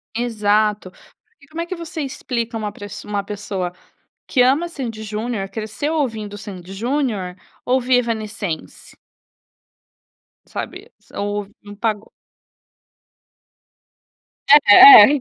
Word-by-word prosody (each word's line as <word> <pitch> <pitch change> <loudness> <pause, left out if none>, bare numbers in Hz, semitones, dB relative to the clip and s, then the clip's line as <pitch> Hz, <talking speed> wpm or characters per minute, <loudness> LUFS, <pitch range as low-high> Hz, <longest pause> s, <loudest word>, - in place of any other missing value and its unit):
Exato. 210 -4 0
Por - - -26
que 280 - -20
como 320 +3 -6
é 335 - -3
que 370 - -5
você 330 -2 -6
explica 235 -4 -4
uma 210 -1 -4
presso 205 0 -10
uma 205 -1 -2
pessoa 195 -3 -5 0.5
que 255 - 0
ama 280 +7 +3
Sandy& 235 -9 -6
Junior, 215 -1 -4
cresceu 220 +8 -4
ouvindo 220 -9 -3
Sandy& 190 -3 -10
Junior, 220 -4 -2 0.3
ouvir 255 0 +2
Evanescence? 215 -7 -5 1.5
Sabe, - - -8
s - - -26
ou 205 0 -3
num 205 0 -12
pago 215 0 -3 2.6
É, 205 - +9 0.4
é. 295 - 0
220 Hz, 115 wpm, -20 LUFS, 205-255 Hz, 2.6 s, É